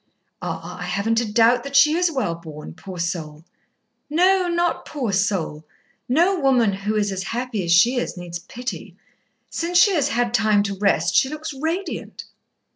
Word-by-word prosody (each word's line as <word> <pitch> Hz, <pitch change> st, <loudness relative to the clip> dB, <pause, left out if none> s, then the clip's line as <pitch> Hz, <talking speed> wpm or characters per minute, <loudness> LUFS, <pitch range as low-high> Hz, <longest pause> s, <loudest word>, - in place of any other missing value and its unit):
"Ah! -, -, -6 dB
I -, -, -5 dB
haven't 225 Hz, +3 st, 0 dB
a 220 Hz, -3 st, -4 dB
doubt 235 Hz, +2 st, +4 dB
that 280 Hz, 0 st, -6 dB
she 300 Hz, +2 st, +6 dB
is 350 Hz, 0 st, +2 dB
well 260 Hz, -, -1 dB
born, 160 Hz, -3 st, -10 dB
poor 180 Hz, +3 st, -10 dB
soul." 165 Hz, -3 st, -4 dB, 0.6 s
"No, 365 Hz, +4 st, +3 dB
not 345 Hz, 0 st, 0 dB
'poor 260 Hz, -8 st, -3 dB
soul.' 190 Hz, -6 st, -1 dB, 0.5 s
No 345 Hz, +8 st, +3 dB
woman 250 Hz, -7 st, +3 dB
who 200 Hz, +2 st, -3 dB
is 205 Hz, -1 st, 0 dB
as 190 Hz, -1 st, -3 dB
happy 230 Hz, +1 st, -3 dB
as 170 Hz, -, -2 dB
she 235 Hz, +9 st, +5 dB
is 245 Hz, -, -3 dB
needs 175 Hz, -1 st, -6 dB
pity. 245 Hz, +8 st, -7 dB, 0.6 s
Since 345 Hz, +1 st, -1 dB
she 390 Hz, +3 st, +6 dB
has 305 Hz, -6 st, +2 dB
had 240 Hz, 0 st, 0 dB
time 215 Hz, -3 st, +3 dB
to 200 Hz, -1 st, -3 dB
rest, 200 Hz, +1 st, +1 dB
she 265 Hz, -, +3 dB
looks 305 Hz, 0 st, -6 dB
radiant." 325 Hz, +6 st, -4 dB
230 Hz, 175 wpm, -22 LUFS, 190-300 Hz, 0.6 s, she